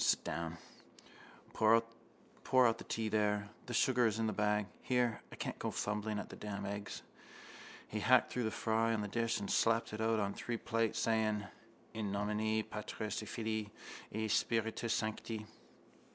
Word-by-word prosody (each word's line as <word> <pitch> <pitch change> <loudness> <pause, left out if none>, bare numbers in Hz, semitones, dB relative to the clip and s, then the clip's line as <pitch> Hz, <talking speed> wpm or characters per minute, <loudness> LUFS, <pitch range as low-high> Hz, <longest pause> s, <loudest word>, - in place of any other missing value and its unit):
Sit - - +3
down. 85 +1 -3 1.0
Pour 110 +1 +6
out 115 +1 +1
the - - -7
tea 115 -1 -1
there. 105 -1 +1 0.2
The 120 - -2
sugar 125 -2 +4
is 110 -1 0
in 115 - +1
the 110 - 0
bag. 105 0 +2 0.2
Here, 125 -3 +1
I - - -8
can't - - -4
go - - -1
fumbling 105 0 -1
at - - -5
the - - -8
damned 105 -1 -5
eggs. 100 +1 -5 0.8
He 105 - -3
hacked 130 +4 +5
through 125 -2 0
the - - +1
fry 115 +1 +1
on 105 - -1
the 105 - -2
dish 115 +1 0
and 100 - -4
slapped 115 -1 +2
it 105 - -3
out 110 0 +2
on 100 -1 0
three 120 -1 -3
plates, 115 -1 0
saying: 110 -2 +1 0.5
—_In 110 -1 -3
nomine 105 +2 0
Patris 105 0 -4
et 110 - -7
Filii 110 -2 -2 0.4
et 110 0 -1
Spiritus 115 +1 +1
Sancti. 110 0 -2
110 Hz, 170 wpm, -36 LUFS, 105-115 Hz, 1.0 s, Pour